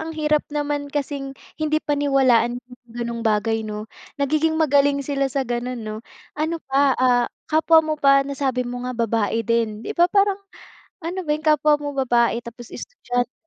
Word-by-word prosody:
ang 320 0 -5
hirap 300 -1 +2
naman 290 -1 -2
kasing 280 -1 -4 0.2
hindi 310 0 +1
paniwalaan 275 -5 +2
'yung 245 0 -13
gano'ng 235 0 -5
bagay, 225 0 +1
'no? 210 0 -5 0.3
Nagiging 310 +3 +1
magaling 285 -2 +3
sila 275 -1 0
sa 270 0 -1
gano'n, 245 +1 -3
'no. 215 0 -5 0.3
Ano 315 +2 -2
pa? 275 0 +2
Ah, 245 -1 +3 0.2
kapwa 320 0 +5
mo 310 - -1
pa, 275 -1 +5
nasabi 270 -3 -2
mo 245 0 -5
nga 255 - -5
babae 225 -1 0
din. 225 -1 -1
'Di - - -3
ba 345 +1 +3
parang 400 0 +2 0.6
ano 345 +3 -4
ba 300 - -4
'yung 305 +1 -3
kapwa 300 0 +4
mo 290 -1 -5
babae 240 -2 +1
tapos 235 0 -10
estudyante. 245 0 -4
275 Hz, 170 wpm, -22 LUFS, 240-300 Hz, 0.6 s, kapwa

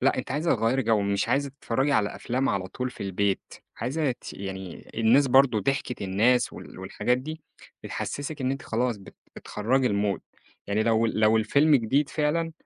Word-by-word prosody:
لأ - - +3
أنتِ - - -4
عايزة 150 +5 +1
تغيِّري 115 +4 +1
جو، 110 -2 +2
مش 100 0 0
عايزة 140 0 +1
تتفرجي 135 +1 -1
على 105 -4 +1
أفلام 130 +3 -1
على 95 -2 -1
طول 125 +4 -4
في - - -9
البيت، 100 0 -1 0.2
عايزة 135 +5 -1
ت - - -10
يعني 95 -2 -7
الناس 115 +5 +4
برضه 130 -4 +4
ضحكة 125 -2 -2
الناس 115 +6 +2
وال - - -11
والحاجات 120 +6 -1
دي، 155 +4 -7 0.4
بتحسّسِك 145 0 -5
إن 130 - 0
أنتِ 135 0 -3
خلاص 120 0 -1
بت 100 - -14 0.2
بتخرّجي 125 +5 0
المود 100 -3 0 0.5
يعني 105 +2 +1
لو 115 0 +2
لو 110 0 +3
الفيلم 140 +8 +4
جديد 135 +4 +2
فعلًا، 160 +3 0
120 Hz, 175 wpm, -26 LUFS, 105-135 Hz, 0.5 s, الناس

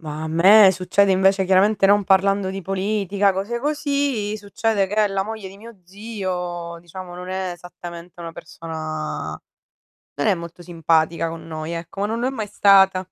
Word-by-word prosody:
Ma 155 -1 -6
a - - -3
me 190 +5 +7
succede 190 +2 +2
invece 190 +1 +3
chiaramente, 195 +2 +3
non 205 +1 +4
parlando 195 0 +2
di 195 +1 -5
politica, 195 +1 0
cose 210 +6 -3
così, 280 -7 -1
succede 205 0 -1
che 210 +1 +2
la 195 -1 -1
moglie 215 -1 -7
di 195 - -13
mio 225 -1 -13
zio, 180 -4 -5
diciamo 175 +1 -10
non 180 +1 -8
è 185 -1 -3
esattamente 175 0 -11
una 165 -1 -7
persona 155 -2 -6 0.8
non 145 - +1
è - - +4
molto 170 +1 -9
simpatica 165 -1 0
con 165 0 -9
noi, 155 0 -5
ecco, 170 +3 -6
ma - - +1
non 225 +1 -3
lo 245 - 0
è - - 0
mai 220 -6 -4
stata. 195 -2 +5
190 Hz, 175 wpm, -21 LUFS, 170-205 Hz, 0.8 s, me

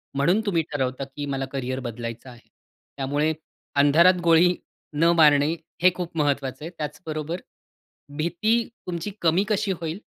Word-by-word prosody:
म्हणून 175 +10 +3
तुम्ही 175 -5 +2
ठरवता 130 -1 -2
की 145 - -4
मला 135 -1 -2
करियर 130 -1 -3
बदलायचं 120 0 -6
आहे. 120 -1 -15 0.5
त्यामुळे 145 +3 0 0.4
अंधारात 170 +6 +5
गोळी 170 +2 +5 0.4
न 165 +3 +4
मारणे 150 -1 +5 0.3
हे 185 - +7
खूप 175 -2 -5
महत्वाचं 140 -1 -1
आहे. - - -5
त्याचबरोबर 155 +2 -5 0.8
भीती 215 +9 +1 0.2
तुमची 175 +3 -3
कमी 170 +4 +3
कशी 205 -1 +1
होईल? 165 +4 -4
155 Hz, 135 wpm, -24 LUFS, 140-175 Hz, 0.8 s, हे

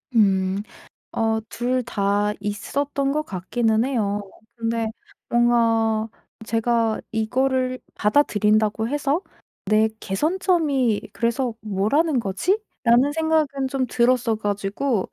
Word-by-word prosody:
음. 195 -2 +2 0.5
어 225 0 +1
2 250 +2 -1
다 205 -2 0
있었던 275 +7 -2
것 305 +2 0
같기는 220 +2 0
해요. 210 -6 -1 0.3
근데 230 -1 -1 0.4
뭔가 230 -2 +2 0.4
제가 230 0 +1
'이거를 255 +3 0 0.2
받아들인다고 215 -2 +2
해서 290 +3 0 0.4
내 215 +2 +4
개선점이 290 - 0
그래서 235 +1 -1
뭐라는 220 - +1
거지?'라는 245 - +1
생각은 310 -4 +1
좀 265 -1 0
들었어 240 -1 +2
가지고 205 +2 -1
230 Hz, 215 characters per minute, -23 LUFS, 215-270 Hz, 0.5 s, 내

